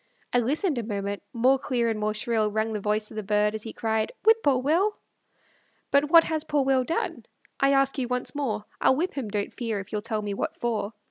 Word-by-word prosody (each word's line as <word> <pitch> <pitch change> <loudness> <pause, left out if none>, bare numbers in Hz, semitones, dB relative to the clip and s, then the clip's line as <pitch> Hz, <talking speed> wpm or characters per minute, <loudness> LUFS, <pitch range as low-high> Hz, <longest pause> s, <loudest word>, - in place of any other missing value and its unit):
I 245 - +5
listened 285 - 0
a - - -3
moment; 200 -2 -3
more 260 +3 +3
clear 240 -3 0
and 220 -2 -1
more 215 0 -1
shrill 220 -1 0
Rang 220 +1 -1
the 210 - -2
voice 210 +1 -1
of - - -10
the - - -1
bird, 210 +1 +1
as 220 - -4
he 225 - -6
cried, 220 -1 -1
"Whip 445 0 +5
poor 280 -7 +3
Will." 335 +11 +1 0.9
But 280 +1 +3
what 330 +1 +8
has 315 -2 -2
poor 295 -3 +1
Will 265 -1 +3
done? 325 +6 -3 0.3
I 275 0 +4
ask 275 +1 +2
you 250 - -1
once 250 0 -1
more; 265 -8 -2 0.2
I'll 260 - +5
whip 345 +7 -1
him, 260 -7 -4
don't 205 -1 -3
fear, 225 -4 -3
if 195 - -9
you'll 210 - -2
tell 215 -1 -2
me 205 -1 -3
what - - -3
for. 225 -3 -2
235 Hz, 230 wpm, -26 LUFS, 215-275 Hz, 0.9 s, what